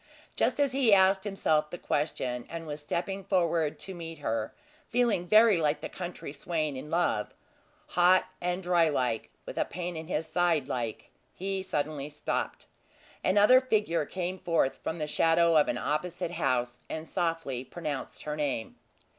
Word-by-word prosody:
Just - - +1
as 285 -2 +3
he 255 -6 +5
asked 190 +1 +4
himself 155 -7 +1
the 175 - -6
question, 125 -6 -2
and 165 0 -6
was 150 -1 -6
stepping 190 +6 -3
forward 170 -5 +1
to 190 - -5
meet 165 -2 -7
her, 115 -6 -2 0.4
feeling 230 -7 +1
very 215 0 +6
like 150 -1 +1
the - - -5
country 175 -5 -6
swain 155 -1 -2
in 135 +3 -7
love 165 -11 0 0.5
"hot 180 +1 +5 0.2
and 180 +1 -1
dry 175 -2 +3
like, 125 -6 -1 0.2
with - - -5
a - - +2
pain 175 +1 -5
in 160 0 -6
his 160 -2 -1
side 165 -4 +1
like" 120 -5 -4 0.2
he 195 +1 -2
suddenly 150 -5 -2
stopped. 150 - -3 0.6
Another 210 +7 +6
figure 210 - +1
came 185 0 -3
forth 165 -6 +1
from 160 - -3
the 155 - -2
shadow 165 +2 +3
of 150 - +5
an 120 - -1
opposite 170 +5 -2
house, 125 -7 -1
and 160 0 -5
softly 165 -8 -2
pronounced 145 -1 -5
her 150 0 -3
name. 140 -7 -2
165 Hz, 165 wpm, -29 LUFS, 150-185 Hz, 0.6 s, very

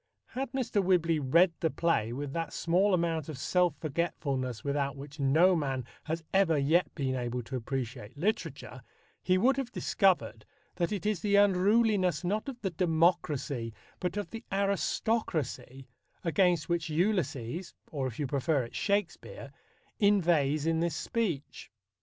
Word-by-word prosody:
Had 265 -1 -4
Mr. 240 -6 0
Whibley 170 -3 +2
read 170 +6 +4
the 160 - +1
play 155 -10 0
with 140 +2 -5
that 165 -1 -3
small 185 +4 +2
amount 165 -3 -1
of 150 - -6
self 175 +3 +1
forgetfulness 140 -7 -2
without 140 0 -1
which 140 +2 -10
no 160 +7 +4
man 135 -6 -2 0.2
has 160 +1 -3
ever 190 -5 +4
yet 155 +6 +2
been 135 -4 -1
able 125 -1 -3
to 130 +4 -6
appreciate 125 -1 -5
literature, 165 - -3 0.4
he 185 0 +2
would 255 +7 +3
have 265 -3 -3
discovered 120 - +1 0.3
that 175 +1 0
it 205 -2 -3
is 210 -4 +1
the 205 +1 +1
unruliness 200 -1 +3
not 210 +9 -1
of 250 -3 -8
the 190 - -2
democracy 160 - 0 0.2
but 180 +2 -2
of 205 - -4
the 225 0 -7
aristocracy 195 - -1 0.4
against 175 0 +2
which 170 -2 -1
Ulysses 160 - -1 0.2
or, 135 -4 -2
if 115 - -7
you 150 - -1
prefer 140 +1 0
it, 115 - -10
Shakespeare 200 -3 -2 0.5
inveighs 170 - +3
in 165 0 +1
this 170 -2 0
speech. 180 -12 -3
165 Hz, 150 wpm, -30 LUFS, 140-190 Hz, 0.5 s, read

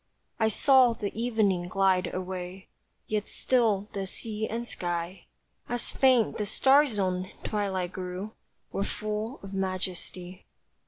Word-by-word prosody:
I 220 - +4
saw 255 +2 +5
the 210 -3 -4
evening 215 -6 +1
glide 190 0 +2
away, 185 0 -6 0.4
Yet 215 -1 -2
still 220 -6 +2
the 195 -1 -3
sea 220 +2 -2
and 235 +1 -4
sky, 175 -1 -4 0.4
As 245 -1 -2
faint 255 -6 +3
the 210 - 0
star 275 +7 +5
zoned 185 -5 -1 0.2
twilight 190 -4 -2
grew, 185 +3 -5 0.4
Were 195 - -1
full 215 +5 -4
of 195 0 -8
majesty. 185 -1 -3
200 Hz, 125 wpm, -28 LUFS, 185-225 Hz, 0.4 s, saw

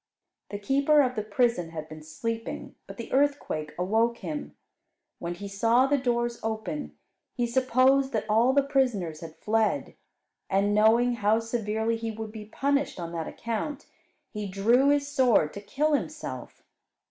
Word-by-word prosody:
The 205 - -4
keeper 280 +7 +3
of 255 -1 -1
the 215 - -1
prison 215 -4 0
had 155 -2 -7
been 155 0 -10
sleeping, 225 +9 -5
but - - -10
the 230 - -7
earthquake 270 - 0
awoke 225 +6 +1
him. 295 +3 -6 0.6
When 175 0 -4
he 200 +3 -7
saw 230 +6 +3
the 285 +1 +2
doors 240 -2 -1
open, 190 - -4 0.4
he 240 - 0
supposed 260 +2 +3
that 215 -1 -1
all 225 +4 +4
the 280 +1 +3
prisoners 245 - 0
had 165 -2 -9
fled; 220 0 0 0.6
and 200 +2 +2
knowing 230 +3 +4
how 215 +1 +3
severely 225 0 -1
he 225 0 -4
would 220 0 -6
be 215 -1 -8
punished 280 +2 -1
on 170 -1 -5
that 165 -2 -4
account, 245 +6 -4 0.5
he 210 -1 -4
drew 230 +8 +3
his 285 0 +2
sword 255 - +3
to 200 - -7
kill 295 +8 0
himself. 300 +1 -4
225 Hz, 160 wpm, -27 LUFS, 205-260 Hz, 0.6 s, all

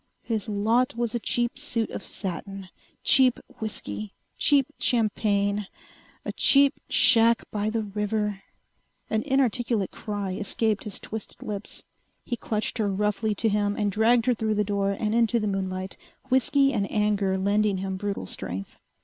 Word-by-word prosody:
His 220 -3 -2
lot 225 +5 +1
was 235 -2 -1
a 240 - 0
cheap 240 +1 0
suit 230 -2 -2
of - - -5
satin! 195 0 -6 0.3
Cheap 260 -3 +5 0.2
whiskey! 105 - -4 0.2
Cheap 280 -2 +4
champagne! 205 -3 +1 0.6
A - - -2
cheap 280 0 +5 0.2
shack 230 0 +5
by 210 0 -1
the 225 0 -1
river.... 210 0 -2 0.7
An 220 - +2
inarticulate 240 -6 +1
cry 205 -3 -4
escaped 215 +2 -1
his 210 - -4
twisted 220 -1 -8
lips. 210 -1 -6 0.4
He 240 - -2
clutched 220 +1 -3
her 205 -2 +1
roughly 210 +2 0
to 225 - 0
him 205 -1 +1
and 205 -2 0
dragged 225 +3 +3
her 250 - +4
through 220 -1 -1
the 210 - +2
door 200 -1 -1
and 215 -1 0
into 235 0 +3
the 215 - -2
moonlight, 190 -2 -3 0.3
whiskey 275 +2 +3
and 200 -4 -1
anger 205 -2 +1
lending 200 +1 +1
him 190 0 -3
brutal 200 - -3
strength. 95 +1 -6
210 Hz, 150 wpm, -26 LUFS, 200-230 Hz, 0.7 s, Cheap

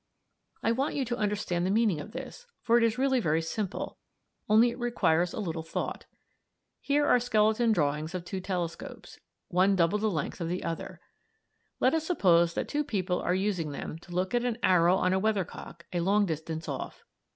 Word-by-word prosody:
] - - -41
"I 225 - +3
want 265 +5 -1
you 275 - 0
to 240 0 -2
understand 205 -5 -1
the 185 - 0
meaning 210 -5 +2
of 215 - -10
this, 265 - -8 0.2
for 230 - +3
it 240 - +5
is 230 0 +2
really 265 0 +2
very 160 -7 +1
simple, 195 +4 -4 0.5
only 225 +3 +5
it 240 - -9
requires 180 -8 +1
a - - -5
little 165 -5 -3
thought. 160 - -4 0.7
Here 290 +1 +1
are 250 - +5
skeleton 220 0 +2
drawings 155 -2 0
of 175 -1 -4
two 185 +2 -4
telescopes 180 -3 -5
(Fig. - - -16 0.3
18), - - -9
one 195 +2 +5
double 175 +3 +2
the 215 +1 +1
length 165 0 -3
of 165 - -2
the 180 +1 -3
other. 165 - -5 0.8
Let 255 - +3
us 320 -1 0
suppose 170 - +3
that - - -2
two 295 +1 -1
people 190 -9 -1
are 180 - +1
using 185 -6 -1
them 155 - -6
to 175 - -15
look 185 +3 -1
at 240 0 +2
an 240 -2 -1
arrow 180 -1 +5
on 185 -1 +1
a 190 - +2
weathercock 195 -4 -3
a 175 - 0
long 200 +4 +3
distance 160 -1 -4
off. 140 -3 -6
195 Hz, 205 wpm, -29 LUFS, 170-230 Hz, 0.8 s, it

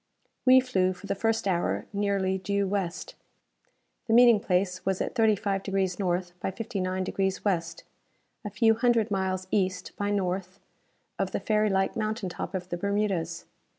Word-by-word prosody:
We 260 0 +9
flew, 185 -8 +1
for 185 - -13
the 200 - -1
first 225 +1 0
hour, 175 -2 0
nearly 200 -2 0
due 200 +1 0
west. 190 -3 -3 0.9
The 225 - +1
meeting 240 -3 +7
place 185 -1 0
was 190 -1 0
at - - -2
35 210 -4 +1
deg. 195 0 -5 0.2
N. 180 -2 +1 0.2
by - - -2
59 190 -3 -3
deg. - - -5 0.3
W., 190 -5 +2 0.8
a 210 - -4
few 225 +2 +3
hundred 230 -2 +2
miles 190 -1 -1
east 185 -3 0
by 205 0 -1
north 190 -1 -2 0.6
of - - -1
the - - 0
fairy 215 -1 +1
like 190 0 +1
mountaintop 215 -3 -3
of 180 -1 -5
the 175 - -3
Bermudas. 195 -4 -1
195 Hz, 155 wpm, -27 LUFS, 185-215 Hz, 0.9 s, We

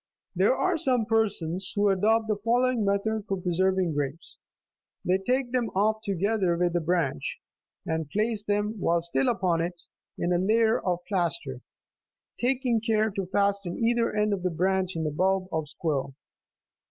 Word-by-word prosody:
There - - +3
are 370 -2 +1
some 255 -6 +1
persons 200 -5 -1
who 205 0 +3
adopt 215 +4 +2
the 215 - +1
following 240 +2 +1
method 200 +1 0
for 195 -1 -2
preserving 185 0 +1
grapes. 145 +2 -4 0.7
They 185 +1 +2
take 250 +5 0
them 245 -3 0
off 215 +2 +2
together 200 -2 0
with 175 0 +1
the 175 - +2
branch, 165 - -1 0.5
and 160 -2 -2
place 215 +3 0
them, 210 +1 -1
while 170 -2 +1
still 170 +9 +1
upon 185 -7 +1
it, 175 +1 -4 0.3
in 175 +1 0
a 175 - +2
layer 220 +4 +3
of 175 -1 -1
plaster,32 190 - -2 0.8
taking 245 -2 +1
care 220 -1 +1
to 195 -2 -4
fasten 200 -2 0
either 235 0 +1
end 210 0 +2
of 195 - -2
the 180 - 0
branch 185 +2 0
in 160 -1 -2
a 155 - -1
bulb 190 +4 +1
of 160 -2 -2
squill. 140 -4 -2
195 Hz, 165 wpm, -27 LUFS, 175-220 Hz, 0.8 s, There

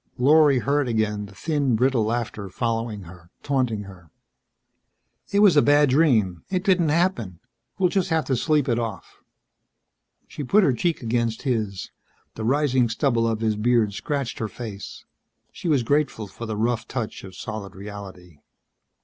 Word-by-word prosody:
Lorry 145 +1 +5
heard 140 +2 +1
again 105 -3 -1
the 100 - -16
thin, 145 -1 0
brittle 125 0 +2
laughter 110 -3 -3
following 115 0 -2
her, 85 -1 -14
taunting 125 -7 0
her. 90 -4 -14 1.2
"It 200 0 +3
was 200 -6 +6
a 145 - +7
bad 145 -1 +4
dream. 115 - +2
It 185 -1 -1
didn't 180 -5 +3
happen. 150 - 0 0.4
We'll 185 -2 +3
just 190 -1 0
have 160 -3 +1
to 130 - 0
sleep 150 +2 +1
it 120 -2 +1
off." 115 -4 -6 1.1
She 145 - -7
put 200 +10 +4
her 135 - +3
cheek 165 +3 -1
against 115 -1 -1
his. 110 -8 -2 0.4
The - - -6
rising 130 -1 +2
stubble 115 0 +1
of 110 -1 -1
his 110 -1 +1
beard 110 -1 +2
scratched 140 +3 -3
her 110 - -2
face. 105 -3 -8 0.5
She - - -7
was 145 -6 +2
grateful 140 -4 0
for 110 +4 -8
the 110 -1 -3
rough 115 0 -1
touch 115 -4 -5
of 95 -1 -10
solid 105 -3 -7
reality. 95 -5 -10
120 Hz, 160 wpm, -24 LUFS, 105-145 Hz, 1.2 s, a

